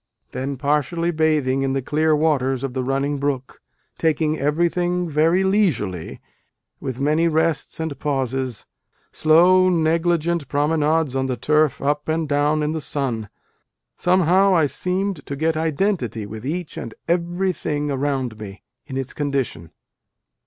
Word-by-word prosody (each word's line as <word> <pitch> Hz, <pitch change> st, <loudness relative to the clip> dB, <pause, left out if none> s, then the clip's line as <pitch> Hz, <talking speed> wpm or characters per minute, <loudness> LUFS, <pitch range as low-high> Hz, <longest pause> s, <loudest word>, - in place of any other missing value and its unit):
then 135 Hz, +2 st, -4 dB
partially 150 Hz, +5 st, 0 dB
bathing 155 Hz, -5 st, +1 dB
in 135 Hz, 0 st, 0 dB
the 135 Hz, -, 0 dB
clear 155 Hz, +3 st, +2 dB
waters 135 Hz, -4 st, +1 dB
of 135 Hz, -2 st, -3 dB
the 130 Hz, -1 st, -2 dB
running 135 Hz, +2 st, -1 dB
brook 135 Hz, -2 st, -3 dB, 0.4 s
taking 155 Hz, -1 st, +1 dB
everything 175 Hz, +4 st, 0 dB
very 165 Hz, +4 st, +2 dB
leisurely, 150 Hz, -, 0 dB, 0.6 s
with 130 Hz, -1 st, -5 dB
many 155 Hz, +4 st, +2 dB
rests 160 Hz, 0 st, 0 dB
and 160 Hz, -4 st, -4 dB
pauses.... 130 Hz, -4 st, -2 dB, 0.5 s
slow 180 Hz, +4 st, +5 dB
negligent 165 Hz, -1 st, +1 dB
promenades 150 Hz, 0 st, +1 dB
on 130 Hz, 0 st, 0 dB
the 130 Hz, -2 st, -2 dB
turf 150 Hz, 0 st, +1 dB
up 145 Hz, +1 st, 0 dB
and 160 Hz, 0 st, 0 dB
down 145 Hz, +1 st, +1 dB
in 150 Hz, -, 0 dB
the 160 Hz, 0 st, -3 dB
sun... 120 Hz, -8 st, -3 dB, 0.7 s
somehow 185 Hz, +2 st, +3 dB
I 160 Hz, -3 st, +4 dB
seemed 185 Hz, +3 st, -2 dB
to 140 Hz, -, -4 dB
get 160 Hz, +3 st, 0 dB
identity 160 Hz, -, -1 dB
with 110 Hz, +4 st, -7 dB
each 170 Hz, +2 st, -4 dB
and 115 Hz, -, -6 dB
everything 170 Hz, -4 st, -1 dB
around 135 Hz, -5 st, -2 dB
me, 100 Hz, -2 st, -9 dB, 0.2 s
in 135 Hz, -2 st, -5 dB
its 135 Hz, -1 st, -3 dB
condition. 135 Hz, -, -2 dB
150 Hz, 140 wpm, -22 LUFS, 135-165 Hz, 0.7 s, slow